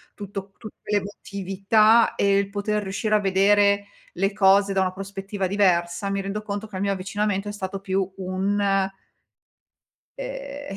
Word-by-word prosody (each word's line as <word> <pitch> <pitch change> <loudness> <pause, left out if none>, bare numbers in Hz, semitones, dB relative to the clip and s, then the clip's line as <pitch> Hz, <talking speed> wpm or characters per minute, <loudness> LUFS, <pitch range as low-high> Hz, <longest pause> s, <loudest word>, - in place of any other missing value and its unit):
tutto 195 -1 -7
tutte 215 - -11
l'emotività 205 +2 +2
e 200 0 +3
il 200 0 0
poter 210 +1 -1
riuscire 205 +2 -2
a - - +4
vedere 200 +1 +3 0.3
le 195 +3 0
cose 200 0 +4
da 195 - +1
una 185 -1 +1
prospettiva 195 +1 -5
diversa, 185 -1 +1
mi 195 0 -1
rendo 195 +2 -4
conto 210 0 -5
che 210 - -11
il - - -3
mio 200 0 +1
avvicinamento 195 +1 -2
è - - -3
stato 195 -1 -5
più 190 -1 -1
un 190 +2 -1 1.6
ehm, 290 - -6
200 Hz, 150 wpm, -24 LUFS, 195-205 Hz, 1.6 s, a